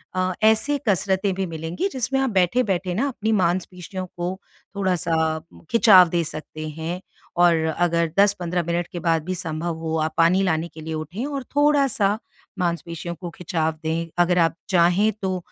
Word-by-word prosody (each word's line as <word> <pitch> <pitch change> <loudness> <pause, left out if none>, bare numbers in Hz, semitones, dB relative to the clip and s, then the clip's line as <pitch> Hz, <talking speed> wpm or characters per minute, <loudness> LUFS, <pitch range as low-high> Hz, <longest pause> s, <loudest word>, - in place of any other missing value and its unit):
अ, 185 0 0
ऐसे 220 +7 +3
कसरतें 195 0 +1
भी 195 - -1
मिलेंगी 165 - -3
जिसमें 265 +1 -1
आप 270 -1 +1
बैठे-बैठे 190 -1 +1
ना 255 +8 +1
अपनी 220 -3 -2
मांसपेशियों 185 -1 -1
को 180 +2 -3 0.4
थोड़ा-सा 180 -4 0 0.6
खिंचाव 200 -6 +7
दे 170 -1 +1
सकते 155 0 -7
हैं। 165 +4 -5 0.4
और 175 -1 +5 0.2
अगर 170 -2 +1
10-15 180 -4 +2
मिनट 170 0 -1
के 175 - -3
बाद 165 -1 +1
भी 185 +1 -2
संभव 165 -1 -3
हो 160 0 -2
आप 155 0 -2
पानी 170 +3 +4
लाने 165 -3 0
के 160 - -10
लिए 160 +1 -5
उठें 155 - -4
और 280 -2 -4
थोड़ा-सा 275 -9 +3 0.4
मांसपेशियों 170 -1 -3
को 175 +1 -7
खिंचाव 160 -2 -1
दें। 165 +1 -2
अगर 180 +1 +1
आप 165 -1 +2
चाहें 185 +3 +4
तो 185 -1 -1
180 Hz, 160 wpm, -23 LUFS, 165-200 Hz, 0.6 s, खिंचाव